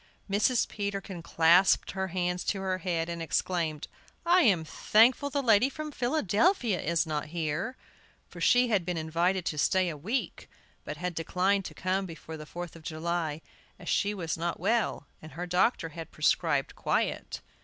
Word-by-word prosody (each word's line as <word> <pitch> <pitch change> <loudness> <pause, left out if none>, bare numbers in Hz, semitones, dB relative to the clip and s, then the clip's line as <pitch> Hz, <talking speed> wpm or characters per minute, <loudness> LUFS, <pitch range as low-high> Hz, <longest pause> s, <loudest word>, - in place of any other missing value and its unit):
Mrs. 210 +5 +2
Peterkin 195 -3 -4
clasped 170 +3 +4
her 190 0 -2
hands 180 0 -2
to 195 - -1
her 185 -1 -1
head 170 -3 -1
and 170 -1 -5
exclaimed: 165 -2 -1 0.4
"I 355 +2 +5
am 190 - +3
thankful 235 - +3
the 280 0 -1
lady 230 +2 +4
from 305 +1 -6
Philadelphia 240 - +1
is 170 +2 +1
not 155 -2 -2
here!" 165 - -3 0.5
For - - -11
she 245 0 +4
had 205 -5 +2
been 175 0 -3
invited 170 +3 0
to 150 - -2
stay 185 +3 +2
a 160 - -5
week, 215 - -3 0.4
but - - -5
had 180 0 -3
declined 185 +4 0
to - - -8
come 190 +1 -1
before 160 -1 -9
the 155 -1 -9
Fourth 175 0 -7
of 165 - -12
July, 160 -1 -3 0.4
as - - -13
she 205 +1 +1
was 165 -4 -3
not 170 +1 -2
well, 215 -4 0 0.2
and 155 - -11
her 175 +3 -4
doctor 180 0 +1
had 165 +1 -8
prescribed 150 - +1
quiet. - - -1
180 Hz, 170 wpm, -29 LUFS, 165-205 Hz, 0.5 s, I